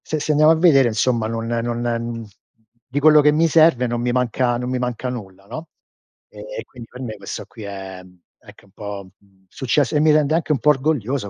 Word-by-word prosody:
Se 155 Hz, -, -2 dB
se 150 Hz, -, -1 dB
andiamo 155 Hz, +1 st, +5 dB
a -, -, +4 dB
vedere 150 Hz, -7 st, +5 dB
insomma 115 Hz, 0 st, 0 dB
non 115 Hz, 0 st, -4 dB
non 120 Hz, 0 st, -2 dB
n 115 Hz, -1 st, -3 dB, 0.6 s
di 130 Hz, +3 st, -2 dB
quello 155 Hz, +1 st, +6 dB
che 150 Hz, +1 st, +4 dB
mi 160 Hz, +2 st, +2 dB
serve 155 Hz, -5 st, +4 dB
non 120 Hz, 0 st, -2 dB
mi 120 Hz, 0 st, 0 dB
manca 125 Hz, 0 st, 0 dB
non 125 Hz, +1 st, -4 dB
mi 130 Hz, 0 st, -2 dB
manca 125 Hz, 0 st, -3 dB
nulla, 100 Hz, -6 st, -8 dB
no, 160 Hz, +9 st, -8 dB, 0.6 s
ehm, -, -, -8 dB
quindi 120 Hz, -3 st, -13 dB
per 125 Hz, -, -11 dB
me 115 Hz, -4 st, -5 dB
questo 100 Hz, -1 st, -7 dB
qui 110 Hz, -, -12 dB
è, 95 Hz, -2 st, -8 dB
mhmm, 90 Hz, -1 st, -20 dB, 0.2 s
anche -, -, -17 dB
un 100 Hz, -, -25 dB
po', 100 Hz, -1 st, -8 dB
mhmm, 95 Hz, -1 st, -30 dB
succes 130 Hz, +3 st, 0 dB
e 150 Hz, -, +2 dB
mi 155 Hz, +1 st, +4 dB
rende 150 Hz, 0 st, +2 dB
anche 165 Hz, -1 st, -1 dB
un 140 Hz, -, -1 dB
po' 150 Hz, -, +2 dB
orgoglioso 135 Hz, -5 st, 0 dB
125 Hz, 225 wpm, -20 LUFS, 110-150 Hz, 0.6 s, quello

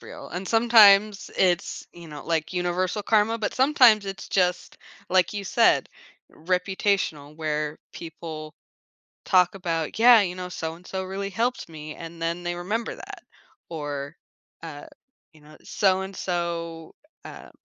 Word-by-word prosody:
real -, -, -11 dB
and 180 Hz, +2 st, -6 dB
sometimes 215 Hz, -3 st, +5 dB
it's, 180 Hz, -2 st, 0 dB
you 170 Hz, -1 st, -12 dB
know, 150 Hz, -1 st, -9 dB
like, 165 Hz, +1 st, -1 dB
universal 180 Hz, +3 st, -1 dB
karma, 220 Hz, +1 st, +2 dB
but 215 Hz, -, -2 dB
sometimes 250 Hz, -6 st, +5 dB
it's 195 Hz, 0 st, -7 dB
just, 180 Hz, -2 st, 0 dB, 0.3 s
like 185 Hz, 0 st, +3 dB
you 200 Hz, -, -3 dB
said, 230 Hz, +4 st, +3 dB, 0.4 s
reputational 180 Hz, -4 st, -1 dB
where 150 Hz, -1 st, -3 dB
people 155 Hz, -2 st, -8 dB, 0.7 s
talk 180 Hz, -1 st, +3 dB
about, 165 Hz, -3 st, -3 dB
"Yeah, 235 Hz, -2 st, +8 dB
you 180 Hz, -2 st, -2 dB
know, 180 Hz, 0 st, -6 dB
so-and-so 175 Hz, +3 st, -5 dB
really 195 Hz, +1 st, -4 dB
helped 230 Hz, -1 st, -2 dB
me," 155 Hz, -1 st, -9 dB
and 165 Hz, 0 st, -10 dB
then 170 Hz, +1 st, -2 dB
they 175 Hz, 0 st, -3 dB
remember 210 Hz, +6 st, -3 dB
that, -, -, -11 dB, 0.5 s
or, 145 Hz, -1 st, -5 dB, 0.5 s
uh, 145 Hz, -3 st, -9 dB, 0.5 s
you 155 Hz, -, -19 dB
know, 155 Hz, +1 st, -16 dB
"So-and-so," 175 Hz, -4 st, -2 dB, 0.3 s
um, -, -, -11 dB
180 Hz, 135 wpm, -25 LUFS, 165-200 Hz, 0.7 s, Yeah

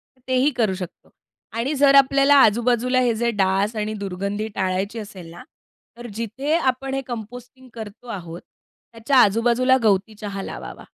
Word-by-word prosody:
तर 255 Hz, -, -32 dB
तेही 260 Hz, +2 st, +2 dB
करू 215 Hz, -5 st, +1 dB
शकतो 185 Hz, -2 st, -9 dB, 0.5 s
आणि 265 Hz, +6 st, -1 dB
जर 280 Hz, -1 st, +6 dB
आपल्याला 275 Hz, +1 st, +5 dB
आजूबाजूला 240 Hz, +3 st, +2 dB
हे 245 Hz, -2 st, +2 dB
जे 235 Hz, +1 st, 0 dB
डास 195 Hz, +1 st, 0 dB
आणि 215 Hz, 0 st, -2 dB
दुर्गंधी 200 Hz, +1 st, -4 dB
टाळायची 190 Hz, +4 st, -2 dB
असेल 200 Hz, -5 st, -9 dB
ना, 175 Hz, -, -11 dB, 0.5 s
तर 240 Hz, 0 st, -8 dB
जिथे 240 Hz, +7 st, -3 dB
आपण 265 Hz, -1 st, -1 dB
हे 270 Hz, -, -1 dB
कंपोस्टिंग 245 Hz, +3 st, -9 dB
करतो 220 Hz, +1 st, -10 dB
आहोत, 175 Hz, -5 st, -7 dB, 0.5 s
त्याच्या 230 Hz, +4 st, 0 dB
आजूबाजूला 240 Hz, +4 st, +4 dB
गवती 210 Hz, 0 st, +1 dB
चहा 200 Hz, -1 st, -4 dB
लावावा. -, -, -8 dB
230 Hz, 155 wpm, -22 LUFS, 200-255 Hz, 0.5 s, जर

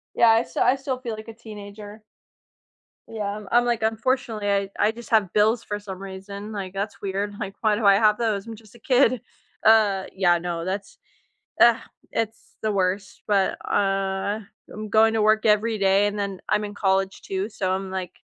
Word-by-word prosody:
Yeah. 235 Hz, -, +5 dB
I 225 Hz, +1 st, +5 dB
still -, -, -2 dB
I 255 Hz, +2 st, +4 dB
still 265 Hz, -1 st, -3 dB
feel 235 Hz, -4 st, -5 dB
like 215 Hz, +1 st, -10 dB
a 225 Hz, -, -8 dB
teenager. 210 Hz, -1 st, -10 dB, 1.1 s
Yeah. 215 Hz, -2 st, -4 dB
I'm 210 Hz, -2 st, -9 dB
I'm 240 Hz, +1 st, +5 dB
like, 240 Hz, -2 st, 0 dB
unfortunately, 225 Hz, -1 st, 0 dB
I 200 Hz, -1 st, 0 dB
I 210 Hz, -, +3 dB
just 235 Hz, +2 st, -11 dB
have 215 Hz, -5 st, +3 dB
bills 220 Hz, +3 st, +3 dB
for 205 Hz, 0 st, -3 dB
some 195 Hz, -3 st, -8 dB
reason, 195 Hz, +2 st, -8 dB
like, 195 Hz, -3 st, -5 dB
that's 200 Hz, +2 st, -4 dB
weird. 200 Hz, +1 st, -2 dB
Like, 195 Hz, -1 st, -5 dB
"Why 215 Hz, -2 st, +2 dB
do 225 Hz, -, -3 dB
I 200 Hz, -1 st, +7 dB
have 210 Hz, 0 st, +4 dB
those? 215 Hz, -3 st, -1 dB
I'm 225 Hz, -1 st, -7 dB
just 215 Hz, 0 st, -18 dB
a -, -, -15 dB
kid." 255 Hz, -1 st, +3 dB, 0.4 s
Uh. 210 Hz, -4 st, +4 dB
Yeah, 175 Hz, -2 st, +3 dB
no. 170 Hz, -1 st, -4 dB
That's 195 Hz, +2 st, -5 dB, 0.6 s
ugh 235 Hz, -1 st, +7 dB, 0.4 s
it's 225 Hz, 0 st, -4 dB
the 215 Hz, -, 0 dB
worst 190 Hz, 0 st, -2 dB
but, 200 Hz, -2 st, +2 dB
uh, 195 Hz, +1 st, 0 dB, 0.3 s
I'm 215 Hz, 0 st, -6 dB
going 220 Hz, +1 st, +4 dB
to 220 Hz, -, +1 dB
work 215 Hz, +1 st, +3 dB
every 215 Hz, +1 st, +3 dB
day 195 Hz, +1 st, +3 dB
and 205 Hz, 0 st, -3 dB
then, 200 Hz, -2 st, -3 dB
I'm 210 Hz, 0 st, +1 dB
in 205 Hz, -, -7 dB
college, 195 Hz, -1 st, 0 dB
too, 195 Hz, +1 st, -3 dB
so 195 Hz, -4 st, -2 dB
I'm, 190 Hz, 0 st, -2 dB
like, 185 Hz, -2 st, -4 dB
210 Hz, 195 wpm, -24 LUFS, 195-220 Hz, 1.1 s, I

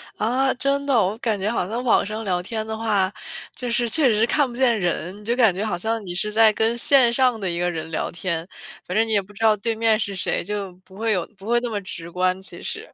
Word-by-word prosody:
啊， 260 Hz, +4 st, +1 dB
真 280 Hz, +2 st, 0 dB
的。 280 Hz, -, 0 dB
我 195 Hz, +4 st, -2 dB
感 225 Hz, -3 st, -2 dB
觉 205 Hz, +3 st, -1 dB
好 205 Hz, -6 st, -1 dB
像 235 Hz, +5 st, -4 dB
网 245 Hz, -, +3 dB
上 215 Hz, +2 st, -5 dB
聊 180 Hz, -4 st, -1 dB
天 215 Hz, +4 st, -4 dB
的 220 Hz, 0 st, -5 dB
话， 205 Hz, -4 st, +1 dB, 0.4 s
就 250 Hz, -, -3 dB
是 235 Hz, 0 st, +1 dB
确 265 Hz, -1 st, +5 dB
实 215 Hz, +1 st, +3 dB
看 285 Hz, +4 st, +1 dB
不 240 Hz, -, -10 dB
见 245 Hz, -3 st, +2 dB
人， 180 Hz, +2 st, -3 dB
就 235 Hz, +3 st, -1 dB
感 230 Hz, -6 st, +4 dB
觉 195 Hz, +4 st, -3 dB
好 195 Hz, -5 st, -2 dB
像 225 Hz, +4 st, -2 dB
你 175 Hz, -, -5 dB
是 210 Hz, +4 st, -1 dB
在 220 Hz, 0 st, +5 dB
跟 225 Hz, +2 st, 0 dB
线 250 Hz, -1 st, +6 dB
上 250 Hz, -2 st, +2 dB
的 190 Hz, -3 st, -2 dB
一 170 Hz, 0 st, -3 dB
个 175 Hz, 0 st, 0 dB
人 160 Hz, -2 st, -5 dB
聊 160 Hz, -, -2 dB
天。 170 Hz, -1 st, -3 dB, 0.4 s
反 180 Hz, -, -5 dB
正 220 Hz, +1 st, +3 dB
你 -, -, 0 dB
也 205 Hz, -2 st, +3 dB
不 195 Hz, +2 st, -17 dB
知 205 Hz, -, -7 dB
道 220 Hz, -1 st, +5 dB
对 225 Hz, +2 st, -2 dB
面 220 Hz, -1 st, +2 dB
是 200 Hz, -3 st, -1 dB
谁， 185 Hz, -, +2 dB
就 200 Hz, 0 st, -4 dB
不 190 Hz, +1 st, -17 dB
会 225 Hz, +1 st, -1 dB
有 180 Hz, -5 st, 0 dB
不 195 Hz, -, -14 dB
会 240 Hz, +1 st, +2 dB
那 240 Hz, -, -3 dB
么 210 Hz, -2 st, -3 dB
直 170 Hz, -3 st, -6 dB
观， 185 Hz, +1 st, 0 dB
其 190 Hz, -, 0 dB
实。 -, -, -5 dB
215 Hz, 290 characters per minute, -22 LUFS, 190-235 Hz, 0.4 s, 线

